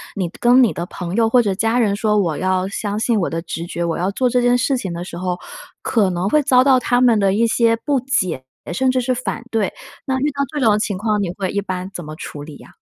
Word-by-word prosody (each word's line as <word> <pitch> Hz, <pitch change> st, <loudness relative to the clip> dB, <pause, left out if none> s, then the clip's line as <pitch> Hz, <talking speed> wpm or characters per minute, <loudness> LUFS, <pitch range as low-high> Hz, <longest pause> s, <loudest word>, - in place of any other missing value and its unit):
你 185 Hz, -4 st, -2 dB
跟 245 Hz, +2 st, +5 dB
你 235 Hz, -, +3 dB
的 170 Hz, -, -4 dB
朋 180 Hz, 0 st, -6 dB
友 230 Hz, -1 st, +4 dB
或 245 Hz, +2 st, +4 dB
者 205 Hz, -4 st, 0 dB
家 225 Hz, +5 st, 0 dB
人 210 Hz, -3 st, +2 dB
说 210 Hz, +1 st, +1 dB
我 170 Hz, -7 st, 0 dB
要 185 Hz, 0 st, 0 dB
相 205 Hz, +1 st, -3 dB
信 225 Hz, 0 st, +1 dB
我 180 Hz, -, 0 dB
的 165 Hz, -, -3 dB
直 165 Hz, 0 st, -5 dB
觉， 170 Hz, 0 st, -3 dB
我 170 Hz, -1 st, -1 dB
要 180 Hz, +3 st, 0 dB
做 250 Hz, +5 st, +1 dB
这 245 Hz, +1 st, +2 dB
件 245 Hz, 0 st, +3 dB
事 260 Hz, +2 st, +1 dB
情 190 Hz, -7 st, -4 dB
的 170 Hz, +1 st, -5 dB
时 175 Hz, -1 st, -8 dB
候， 180 Hz, 0 st, -2 dB, 0.4 s
可 210 Hz, -5 st, +1 dB
能 180 Hz, +2 st, -1 dB
会 300 Hz, +6 st, +3 dB
遭 255 Hz, -3 st, +4 dB
到 265 Hz, -1 st, +5 dB
他 245 Hz, 0 st, +1 dB
们 235 Hz, -4 st, +4 dB
的 195 Hz, -1 st, +2 dB
一 225 Hz, +3 st, +2 dB
些 230 Hz, 0 st, +3 dB
不 270 Hz, +4 st, -1 dB
解， 185 Hz, -, -1 dB, 0.3 s
甚 260 Hz, +9 st, +1 dB
至 255 Hz, 0 st, +1 dB
是 255 Hz, +1 st, 0 dB
反 250 Hz, -1 st, -4 dB
对。 220 Hz, -4 st, 0 dB, 0.3 s
那 265 Hz, -1 st, 0 dB
遇 295 Hz, +2 st, +1 dB
到 280 Hz, 0 st, -3 dB
这 295 Hz, -, -2 dB
种 215 Hz, -2 st, +4 dB
情 205 Hz, -2 st, -2 dB
况 210 Hz, +1 st, 0 dB
你 190 Hz, -, -1 dB
会 190 Hz, 0 st, -3 dB
一 200 Hz, -, -1 dB
般 185 Hz, -1 st, -5 dB
怎 175 Hz, -, -7 dB
么 155 Hz, 0 st, -8 dB
处 150 Hz, -2 st, -8 dB
理 145 Hz, -1 st, -10 dB
啊？ -, -, -16 dB
210 Hz, 290 characters per minute, -19 LUFS, 180-245 Hz, 0.4 s, 跟